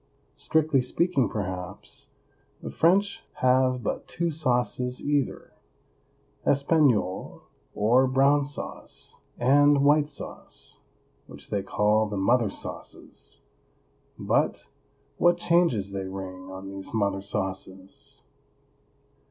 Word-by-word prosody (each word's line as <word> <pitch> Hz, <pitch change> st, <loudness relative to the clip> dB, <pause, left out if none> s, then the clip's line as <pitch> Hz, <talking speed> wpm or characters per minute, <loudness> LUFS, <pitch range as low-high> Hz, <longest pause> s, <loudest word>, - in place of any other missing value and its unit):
Strictly 155 Hz, -4 st, +2 dB
speaking, 140 Hz, +1 st, +1 dB
perhaps, 95 Hz, -2 st, -5 dB, 0.5 s
the -, -, -7 dB
French 200 Hz, +4 st, +2 dB
have 130 Hz, -1 st, +2 dB
but -, -, -3 dB
two 170 Hz, 0 st, -1 dB
sauces 125 Hz, -3 st, 0 dB
either, 145 Hz, -2 st, -1 dB, 0.9 s
espagnole, 140 Hz, -, +1 dB, 0.3 s
or 120 Hz, +5 st, +4 dB
brown 140 Hz, +2 st, +4 dB
sauce, 140 Hz, +1 st, -6 dB, 0.2 s
and 140 Hz, +3 st, +4 dB
white 145 Hz, 0 st, +5 dB
sauce, -, -, -8 dB, 0.5 s
which -, -, -11 dB
they 100 Hz, -, 0 dB
call 105 Hz, +2 st, +2 dB
the 105 Hz, -1 st, -4 dB
mother 115 Hz, +3 st, +3 dB
sauces; -, -, -7 dB, 0.8 s
but -, -, 0 dB, 0.5 s
what 175 Hz, 0 st, +4 dB
changes 170 Hz, -, +2 dB
they 95 Hz, -1 st, -4 dB
ring 95 Hz, -1 st, -7 dB
on 95 Hz, +1 st, -8 dB
these 100 Hz, +3 st, -5 dB
mother 100 Hz, -2 st, 0 dB
sauces! 95 Hz, -1 st, -6 dB
125 Hz, 100 wpm, -26 LUFS, 100-145 Hz, 0.9 s, white